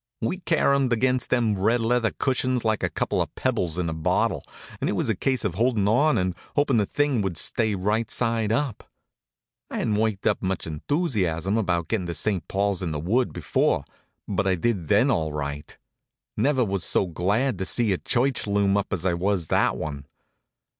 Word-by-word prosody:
We 150 Hz, +11 st, -2 dB
caromed 140 Hz, -7 st, +2 dB
against 125 Hz, +1 st, +1 dB
them 120 Hz, -4 st, +2 dB
red 115 Hz, +5 st, +2 dB
leather 115 Hz, 0 st, +2 dB
cushions 130 Hz, -2 st, -1 dB
like 110 Hz, -1 st, +1 dB
a -, -, 0 dB
couple -, -, -1 dB
of -, -, -4 dB
pebbles 85 Hz, -2 st, -1 dB
in 90 Hz, -2 st, -1 dB
a 80 Hz, -, -2 dB
bottle, 80 Hz, +3 st, 0 dB, 0.4 s
and -, -, -1 dB
it -, -, 0 dB
was -, -, -1 dB
a 110 Hz, -, +2 dB
case 130 Hz, +4 st, 0 dB
of 95 Hz, -, 0 dB
holdin' 110 Hz, 0 st, +1 dB
on 145 Hz, +9 st, +3 dB
and 90 Hz, -1 st, 0 dB, 0.2 s
hoping 145 Hz, -4 st, +2 dB
the 105 Hz, -2 st, +2 dB
thing 145 Hz, -5 st, +1 dB
would 95 Hz, -4 st, -2 dB
stay 110 Hz, -3 st, +1 dB
right 105 Hz, +4 st, 0 dB
side 115 Hz, -3 st, 0 dB
up. 125 Hz, -1 st, -2 dB, 0.8 s
I -, -, -5 dB
hadn't 105 Hz, -2 st, 0 dB
worked 110 Hz, -2 st, -1 dB
up -, -, +2 dB
much 95 Hz, -2 st, -2 dB
enthusiasm 95 Hz, -, -1 dB
about 85 Hz, -6 st, 0 dB
gettin' 100 Hz, -6 st, -1 dB
to 85 Hz, -, -4 dB
St. 100 Hz, -5 st, -1 dB
Paul's 100 Hz, -1 st, 0 dB
in 85 Hz, -3 st, -2 dB
the 75 Hz, -, -3 dB
Wood 115 Hz, -, +1 dB
before, 80 Hz, -6 st, 0 dB, 0.4 s
but 100 Hz, -1 st, 0 dB
I 95 Hz, -, +3 dB
did 90 Hz, -2 st, -1 dB
then, -, -, +4 dB
all 80 Hz, -2 st, 0 dB
right. 75 Hz, 0 st, -5 dB, 0.6 s
Never 130 Hz, -3 st, +2 dB
was 100 Hz, -3 st, -2 dB
so -, -, +2 dB
glad 100 Hz, -, 0 dB
to 95 Hz, -, -2 dB
see 110 Hz, +1 st, +2 dB
a 90 Hz, -, -2 dB
church 130 Hz, -1 st, 0 dB
loom 100 Hz, -1 st, +2 dB
up 100 Hz, -, -2 dB
as 90 Hz, -1 st, -2 dB
I 90 Hz, -, +2 dB
was 90 Hz, -1 st, -1 dB
that -, -, +2 dB
one. 70 Hz, -2 st, -5 dB
105 Hz, 195 wpm, -25 LUFS, 90-120 Hz, 0.8 s, then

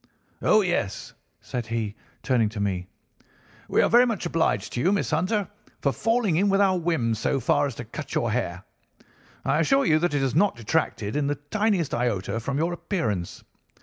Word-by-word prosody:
"'Oh, 215 Hz, -, +5 dB
yes,' 175 Hz, -, -2 dB, 0.3 s
said 120 Hz, -2 st, -5 dB
he, 115 Hz, -3 st, -2 dB, 0.3 s
turning 120 Hz, -5 st, +2 dB
to 105 Hz, 0 st, -7 dB
me, 95 Hz, -3 st, -1 dB, 0.8 s
'we -, -, +3 dB
are -, -, +4 dB
very 245 Hz, +2 st, +6 dB
much 220 Hz, -6 st, -2 dB
obliged 165 Hz, -1 st, 0 dB
to 120 Hz, -, -1 dB
you, 180 Hz, -, +3 dB
Miss 200 Hz, -4 st, 0 dB
Hunter, 185 Hz, +5 st, 0 dB, 0.3 s
for 140 Hz, -, +2 dB
falling 225 Hz, -, +1 dB
in 200 Hz, +3 st, +3 dB
with 195 Hz, 0 st, +3 dB
our 195 Hz, -2 st, +4 dB
whims 125 Hz, -10 st, 0 dB
so 135 Hz, -, 0 dB
far 145 Hz, 0 st, +2 dB
as 135 Hz, -, -6 dB
to 120 Hz, -, -7 dB
cut 145 Hz, +7 st, -7 dB
your 120 Hz, -2 st, +1 dB
hair. 100 Hz, -6 st, -2 dB, 0.8 s
I 150 Hz, -, +2 dB
assure 270 Hz, -, +3 dB
you 155 Hz, -2 st, +4 dB
that 175 Hz, -2 st, 0 dB
it 145 Hz, -, +1 dB
has 135 Hz, -2 st, 0 dB
not 195 Hz, +6 st, +3 dB
detracted 115 Hz, -3 st, -1 dB
in 145 Hz, -1 st, +1 dB
the 145 Hz, -, 0 dB
tiniest 185 Hz, +3 st, -1 dB
iota 115 Hz, -3 st, -1 dB
from 135 Hz, +4 st, -3 dB
your 165 Hz, +3 st, 0 dB
appearance. 110 Hz, -, -3 dB
145 Hz, 190 wpm, -25 LUFS, 115-185 Hz, 0.8 s, very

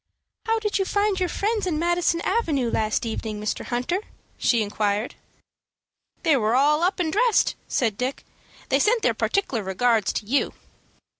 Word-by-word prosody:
"How 450 Hz, 0 st, +2 dB
did 420 Hz, -2 st, -1 dB
you 385 Hz, -, +1 dB
find 405 Hz, 0 st, +1 dB
your 365 Hz, -1 st, 0 dB
friends 420 Hz, +1 st, -1 dB
in 325 Hz, -4 st, 0 dB
Madison 345 Hz, 0 st, +1 dB
Avenue 310 Hz, -, 0 dB
last 215 Hz, +2 st, 0 dB
evening, 220 Hz, -1 st, -4 dB
Mr. 210 Hz, 0 st, -3 dB
Hunter?" 255 Hz, +9 st, -1 dB, 0.4 s
she 235 Hz, -3 st, +2 dB
inquired. 205 Hz, +1 st, -1 dB, 1.1 s
"They 315 Hz, -, +4 dB
were 225 Hz, -2 st, +1 dB
all 295 Hz, +4 st, +3 dB
up 365 Hz, +2 st, +1 dB
and 320 Hz, -3 st, 0 dB
dressed," 470 Hz, +1 st, +3 dB
said 220 Hz, -5 st, 0 dB
Dick. 255 Hz, +2 st, -3 dB, 0.4 s
"They -, -, +3 dB
sent 455 Hz, +1 st, +2 dB
their -, -, +3 dB
partic'lar 335 Hz, -, 0 dB
regards 210 Hz, +2 st, +1 dB
to -, -, -3 dB
you." 270 Hz, +6 st, 0 dB
295 Hz, 160 wpm, -24 LUFS, -, 1.1 s, They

